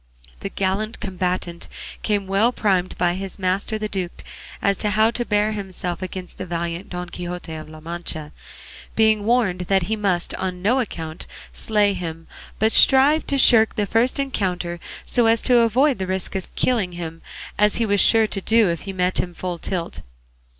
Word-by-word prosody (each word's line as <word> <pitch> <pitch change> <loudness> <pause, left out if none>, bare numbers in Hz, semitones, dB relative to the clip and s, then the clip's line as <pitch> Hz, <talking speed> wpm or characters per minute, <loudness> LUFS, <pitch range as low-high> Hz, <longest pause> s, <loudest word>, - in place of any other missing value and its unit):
The - - -4
gallant 200 +3 -2
combatant 180 -2 -3 0.3
came 205 -2 0
well 200 +5 +2
primed 190 -6 0
by 175 -1 +2
his 190 0 -4
master 195 +3 -1
the 215 0 -3
duke 185 -4 -5 0.4
as 200 - +2
to 210 - 0
how 215 +2 +3
he - - +4
was - - -5
to 240 - -1
bear 210 0 +1
himself 190 -4 -4
against 185 -1 -7
the 185 - -5
valiant 170 +1 -4
Don 180 0 -5
Quixote 175 -1 -6
of 155 -1 -8
La 155 0 -11
Mancha; 160 -2 -4 0.6
being 220 -2 +3
warned 225 -6 +2
that 195 -2 +3
he 220 +6 -1
must 195 -5 0
on 180 -1 -4
no 240 +6 +3
account 165 -8 -5 0.3
slay 210 -2 +1
him, 165 -3 -6 0.3
but 220 +1 +2
strive 275 +6 +5
to 280 - 0
shirk 225 -4 +5
the 210 - 0
first 230 +5 +1
encounter 180 -10 -1 0.3
so 240 -2 +2
as 225 0 +3
to 245 -2 +5
avoid 250 +3 +3
the 190 - -2
risk 190 -1 -3
of 190 - -5
killing 215 -8 +1
him, 165 -1 -6 0.4
as 210 0 +4
he 230 - +1
was 205 -2 +2
sure 225 -1 +5
to 200 -2 -3
do 220 -1 +3
if 170 - -3
he 195 - -6
met 180 0 0
him 175 -1 -2
full 180 -1 -4
tilt. 170 - -4
195 Hz, 190 wpm, -22 LUFS, 180-220 Hz, 0.6 s, strive